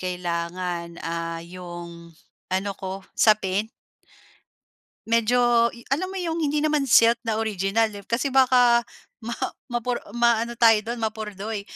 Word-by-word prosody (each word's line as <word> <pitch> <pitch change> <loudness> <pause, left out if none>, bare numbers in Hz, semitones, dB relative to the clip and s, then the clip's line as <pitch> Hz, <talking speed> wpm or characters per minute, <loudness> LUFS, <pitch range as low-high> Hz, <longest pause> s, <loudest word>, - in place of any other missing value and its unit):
kailangan, 175 -1 -4
ah, 165 0 -4
'yong 170 -1 -10 0.4
ano 190 +2 -1
ko, 190 0 -6
sapin 210 -1 +3 1.4
Medyo 235 +1 +3
yu 235 0 -15
alam 370 +6 -3
mo 385 - -5
'yong 330 -2 -2
hindi 295 0 0
naman 300 -1 +1
silk 235 -2 +5
na 220 -2 -1
original, 215 0 +1
eh, 200 - -8
kasi 230 +7 -1
baka 250 -3 +4 0.4
ma 225 - -5 0.4
mapor 240 0 -2 0.2
maano 235 0 +2
tayo 225 -3 +5
do'n, 235 +2 -5
mapurdoy. 215 -1 -4
220 Hz, 130 wpm, -24 LUFS, 185-240 Hz, 1.4 s, silk